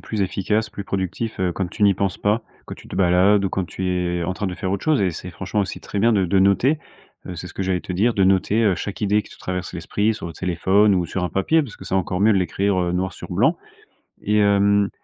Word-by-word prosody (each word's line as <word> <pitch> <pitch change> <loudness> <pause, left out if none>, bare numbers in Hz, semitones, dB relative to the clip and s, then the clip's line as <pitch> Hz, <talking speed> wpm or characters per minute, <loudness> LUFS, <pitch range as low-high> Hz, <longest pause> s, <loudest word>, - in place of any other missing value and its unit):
plus 110 -2 -4
efficace, 105 +3 0
plus 100 -2 -7
productif, 100 +3 -3
heu, 90 -1 +1
quand 95 +2 -2
tu 105 - -5
n'y 100 -1 +5
penses 95 0 -2
pas, 105 +3 +1 0.2
quand - - -7
tu - - -15
te - - -7
balades 95 +3 +4
ou 95 - +1
quand 95 +1 -2
tu 95 +1 -5
es, 90 -1 -1
en 90 +2 -2
train, 105 0 -3
de 90 - -3
faire 95 +1 -3
autre 100 - -2
chose. 155 -3 +3
Et 95 -2 +2
c'est 90 +2 -7
franchement 95 +4 -3
aussi 100 - -4
très 100 - -5
bien 115 +3 +4
de 95 -3 +2
de 95 +3 +2
noter, 100 - +3 0.5
heu. 90 - -6
C'est 90 - -6
ce - - -12
que 95 - -3
j'allais 95 -1 0
te 90 - -6
dire, 115 +6 +2
de 100 - +1
noter, 95 +4 +2
heu, 100 -4 +3
chaque 100 - -6
idée 105 0 +2
qui - - -17
te - - -15
traverse 90 -1 -4
l'esprit, 105 +2 -1
sur 110 - -7
le 85 - -8
téléphone 95 +3 +2
ou 90 -2 0
sur 90 +2 -3
un 90 - -2
papier, 155 - +2
parce 120 -8 -9
que - - -10
c'est - - -2
encore 95 0 -1
mieux 105 0 +5
de - - +3
l'écrire, 95 +2 0
heu, 90 -1 0
noir 90 0 -2
sur - - -9
blanc. - - +2 0.7
Et 105 +1 +1
hem, 100 0 +3
95 Hz, 275 wpm, -22 LUFS, 90-105 Hz, 0.7 s, n'y